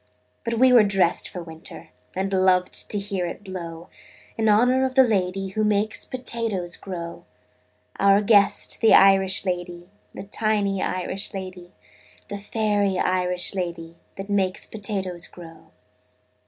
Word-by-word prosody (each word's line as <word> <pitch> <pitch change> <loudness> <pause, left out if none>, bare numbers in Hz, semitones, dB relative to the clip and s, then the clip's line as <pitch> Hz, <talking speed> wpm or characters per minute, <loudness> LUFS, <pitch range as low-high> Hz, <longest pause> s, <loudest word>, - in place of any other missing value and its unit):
But 230 - -2
we 255 +2 +5
were 240 - +8
dressed 195 -4 +1
for 180 - -7
winter, 160 0 -12 0.3
And 195 +1 -2
loved 185 -1 +2
to 210 - +2
hear 195 -3 -3
it 170 - -8
blow 170 -3 -8 0.5
In 220 -1 +1
honor 250 +5 +4
of 260 -1 -2
the 265 - +7
lady 195 -4 -1
Who 215 +3 -2
makes 210 +1 0
potatoes 230 -8 -3
grow 170 -3 -8 0.7
Our 200 +1 +5
guest, 205 -1 +3
the 225 - +6
Irish 195 0 +4
lady, 175 0 -4 0.2
The - - -8
tiny 200 -1 0
Irish 185 +2 -3
lady, 185 -2 -8 0.6
The 205 - -5
fairy 205 -2 0
Irish 180 -1 0
lady 170 -3 -5 0.2
That 195 0 -7
makes 195 -2 0
potatoes 195 -5 -4
grow. 165 -2 -14
195 Hz, 140 wpm, -23 LUFS, 180-210 Hz, 0.7 s, were